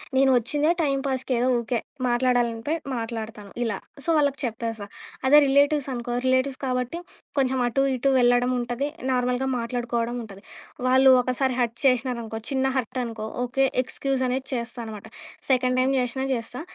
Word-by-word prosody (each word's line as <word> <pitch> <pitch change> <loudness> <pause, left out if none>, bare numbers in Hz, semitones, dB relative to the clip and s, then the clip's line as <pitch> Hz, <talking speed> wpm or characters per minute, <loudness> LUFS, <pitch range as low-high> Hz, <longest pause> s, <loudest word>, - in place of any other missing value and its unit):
నేనొచ్చిందే 270 +4 +3
time 275 -3 +1
పాస్‌కి 260 -1 -1
ఏదో 245 +2 +1
ఊకే 235 0 -1 0.3
మాట్లాడాలనిపి 240 +1 +1 0.2
మాట్లాడతాను 225 -3 -5
ఇలా. 225 -4 -1 0.3
సో, - - -7
వాళ్ళకి 285 -1 +1
చెప్పేస్తా. 225 -2 -4 0.4
అదే 290 +3 +8
రిలేటివ్స్ 285 +1 +3
అనుకో 240 0 -4
రిలేటివ్స్ 260 +1 +1
కాబట్టి 255 +5 -2 0.4
కొంచెం 265 -1 +1
అటు 270 +3 +1
ఇటు 270 +2 +1
వెళ్ళడం 245 +1 +3
ఉంటది. 245 +4 -2 0.2
నార్మల్‌గా 250 +1 0
మాట్లాడుకోవడం 235 0 -2
ఉంటది. 200 -1 -13 0.5
వాళ్ళు 260 +1 +6
ఒకసారి 255 +1 0
హర్ట్ 235 -1 0
చేసినారనుకో, 245 -3 +1
చిన్న 265 -1 +1
హర్ట్ 255 +1 -2
అనుకో 220 -2 -5 0.2
ఓకే. 270 +2 +1 0.2
ఎక్స్‌క్యూజ్ 270 +1 -2
అనేది 260 +1 -2
చేస్తా 235 0 -4
అనమాట. 215 -1 -8 0.4
సెకండ్ 255 0 +2
టైమ్ 265 +1 +2
చేసినా 250 +2 -2
చేస్తా 240 +3 -5
250 Hz, 145 wpm, -25 LUFS, 235-265 Hz, 0.5 s, అదే